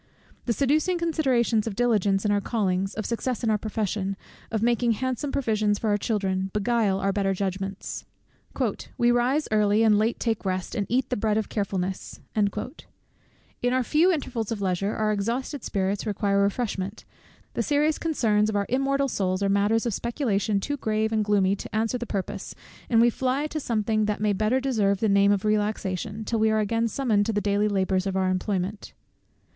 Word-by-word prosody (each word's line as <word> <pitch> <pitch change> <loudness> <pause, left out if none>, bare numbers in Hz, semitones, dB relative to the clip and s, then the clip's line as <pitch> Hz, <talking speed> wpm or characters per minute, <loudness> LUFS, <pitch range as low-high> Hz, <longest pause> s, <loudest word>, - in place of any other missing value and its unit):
The 235 - +1
seducing 305 +8 +1
considerations 260 -10 +1
of 210 - -3
diligence 210 -4 +2
in 210 - +2
our 205 0 +2
callings, 195 -4 -1
of 215 - -3
success 245 +1 -2
in 225 - +2
our 215 - +2
profession, 200 -2 -2 0.3
of 220 -1 -1
making 235 0 +2
handsome 260 +4 -2
provisions 215 -6 +1
for 215 0 -1
our 205 - +3
children, 190 -3 -1
beguile 210 -2 +1
our 195 0 0
better 195 -1 0
judgments. 195 +1 -4 0.9
"We 240 0 +4
rise 250 +5 +2
early, 210 0 +3
and 210 -2 +5
late 225 +2 0
take 225 -3 -1
rest, 185 -2 -2
and 205 -4 -2
eat 255 +2 0
the 250 - +1
bread 215 0 +1
of 220 - -2
carefulness." 190 -2 -3 0.2
In 220 +3 -4
our 255 0 +2
few 315 +9 +3
intervals 250 - -2
of 225 - -2
leisure, 195 +1 -1
our 215 -1 +1
exhausted 235 +6 -2
spirits 195 +2 -1
require 200 -1 +1
refreshment; 200 -1 -2 0.5
the - - -1
serious 300 +1 +1
concerns 215 -10 +1
of 215 - -2
our 200 0 +1
immortal 275 +2 +1
souls, 190 -5 -1
are 200 - +2
matters 205 +3 +2
of 235 - 0
speculation 220 -4 0
too 285 +8 -3
grave 220 -2 0
and 220 -1 +1
gloomy 200 -2 +2
to - - -7
answer 225 +3 0
the 240 - -5
purpose, 195 -2 -4 0.3
and 230 -2 +5
we 240 0 +5
fly 260 +4 0
to 310 0 -3
something 215 -4 0
that 210 0 -1
may 210 0 +1
better 215 +6 +1
deserve 215 -7 +1
the 220 - +1
name 200 0 +4
of 200 0 0
relaxation, 210 0 -1
till 230 0 -1
we 220 0 +3
are 220 - +2
again 230 +2 +1
summoned 225 -3 +1
to - - +1
the 205 - +1
daily 205 0 +1
labours 190 -1 0
of 190 0 -1
our 190 -1 +1
employment. 190 +1 -2
215 Hz, 185 wpm, -26 LUFS, 200-240 Hz, 0.9 s, and